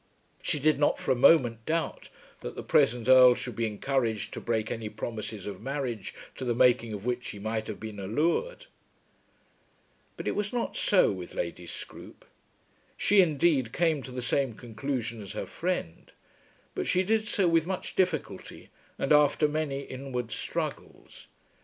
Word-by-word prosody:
She - - 0
did 150 0 +2
not 145 - +3
for - - -2
a - - +4
moment 120 -4 +5
doubt 165 +1 -2 0.3
that - - -7
the - - -6
present 120 0 +2
Earl 130 -1 +8
should 125 -2 -5
be 115 +1 0
encouraged 115 0 -1
to - - -6
break 110 -2 -1
any 115 -2 -4
promises 110 -3 -6
of 100 -2 -6
marriage 130 -5 -4 0.2
to - - -5
the 120 -2 0
making 120 -2 +4
of 105 0 -6
which 125 0 -2
he - - -7
might 110 +1 -3
have 110 - -6
been 110 -2 -7
allured. 170 - -1 1.5
But - - -5
it - - +2
was 205 -1 -2
not 240 -1 -2
so - - +4
with - - -7
Lady - - -4
Scroope. - - -9 0.7
She, 205 -1 +5
indeed, 150 -7 +2
came 160 -2 +1
to 130 - -9
the 125 -1 -5
same 130 0 0
conclusion 115 0 -4
as 100 +1 -7
her 105 - -4
friend, 175 - -4 0.6
but - - -3
she 185 +1 +3
did 220 +2 +1
so 200 -6 +2
with 165 -1 +3
much 190 -1 -4
difficulty 185 -1 -2 0.3
and 135 - -2
after 150 +1 +4
many 150 -2 -2
inward 130 -3 -5
struggles. 110 - -5
130 Hz, 165 wpm, -28 LUFS, 115-155 Hz, 1.5 s, Earl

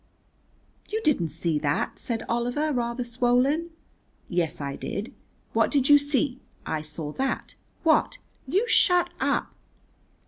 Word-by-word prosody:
"You 435 - -1
didn't 185 - +2
see 160 0 -1
that," 145 -1 -1
said 230 -2 -3
Oliver, 245 +6 0
rather 240 0 -1
swollen. 250 +7 +1 0.6
"Yes, 175 -3 0
I 140 -1 -3
did." 215 - -5 0.4
"What - - +3
did 275 -2 +1
you 290 0 +9
see?" 285 -2 0 0.3
"I 155 -1 -2
saw 150 0 -5
that." 265 - -2 0.3
"What?" 315 -2 +3 0.3
"You 390 - +1
shut 355 -5 +4
up." - - 0
245 Hz, 130 wpm, -26 LUFS, -, 0.6 s, you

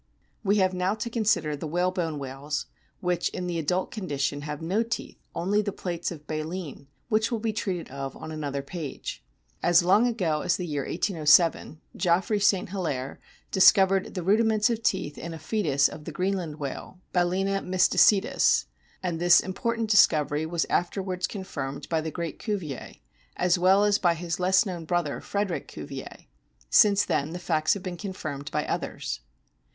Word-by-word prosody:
We 200 +1 +3
have 190 -2 +3
now 185 +3 0
to 220 +2 -5
consider 210 -10 +1
the 150 +3 -5
whalebone 175 -1 -1
whales, 140 +2 -4 0.4
which, 180 -1 0
in 180 - -5
the 175 -2 -2
adult 180 +4 -1
condition, 145 -8 -2
have 150 0 -5
no 185 +7 0
teeth, 230 +1 -4 0.2
only 195 +5 +1
the 205 -1 -2
plates 175 -3 -3
of 150 -4 -9
baleen, 155 -2 -5 0.2
which 220 +2 +2
will 235 - 0
be 220 0 -2
treated 190 -5 -3
of 135 0 -6
on 160 - -8
another 140 -3 -3
page 150 0 -6
(p. - - -42 0.4
So). - - -1
As 175 0 +6
long 205 +7 +4
ago 175 -10 0
as 180 - +1
the 180 - -4
year 145 -4 -2
1807 160 -1 +2
Geoffroy 185 +4 +1
St. 200 -3 +2
Hilaire 150 -9 -3 0.3
discovered 190 0 +5
the 180 - -3
rudiments 215 +3 +3
of 230 -1 -2
teeth 185 -9 -1
in 165 0 -6
a - - -7
fcetus 155 -8 +1
of 150 - -10
the - - -5
Greenland 180 -1 -2
whale, 145 +5 -6
Balcena 190 +2 +1
my 185 0 -4
slice 185 - +6
tus; - - +2 0.4
and 175 -3 -2
this 175 0 +6
important 225 +3 -2
discovery 155 -6 +4
was 170 0 0
afterwards 185 0 -1
confirmed 145 -9 -6
by 160 -2 +1
the 160 - -3
great 170 -1 -5
Cuvier, 185 - -4 0.4
as 180 0 +2
well 190 +3 +5
as 205 0 +3
by 175 -2 +3
his 170 0 -4
less 190 +4 +4
known 180 -4 -5
brother, 175 -3 -1
Frederick 200 -4 -2
Cuvier. 135 -2 -8 0.5
Since 205 -1 +6
then 145 +3 -1
the - - -4
facts 160 -2 +1
have 195 - -7
been 180 -2 -5
confirmed 155 -8 -5
by 150 +1 -1
others. - - -3
175 Hz, 175 wpm, -27 LUFS, 155-195 Hz, 0.5 s, As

